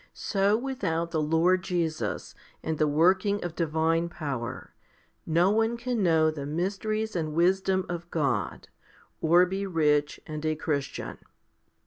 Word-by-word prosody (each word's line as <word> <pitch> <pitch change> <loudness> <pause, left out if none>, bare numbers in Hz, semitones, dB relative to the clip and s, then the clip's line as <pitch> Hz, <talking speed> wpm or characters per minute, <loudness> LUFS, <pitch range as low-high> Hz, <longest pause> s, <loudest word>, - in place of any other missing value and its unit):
So 200 +1 +1
without 185 -11 -2
the 160 - 0
Lord 165 +4 +3
Jesus, 170 -4 -2 0.3
and 160 -1 -2
the 155 - +3
working 185 +7 +2
of 175 -2 -5
divine 165 +1 +1
power, 140 -9 -5 0.5
no 170 +4 +3
one 225 +2 +1
can 240 -1 -2
know 160 -3 +4
the 145 -2 -6
mysteries 205 +7 -2
and 155 -3 -2
wisdom 190 +2 +2
of 175 0 -5
God, 150 -5 -1 0.5
or 170 +3 +5
be 195 +2 -3
rich 150 -4 +1
and 155 0 -6
a 155 0 0
Christian. 145 -3 -3
170 Hz, 135 wpm, -27 LUFS, 155-190 Hz, 0.5 s, or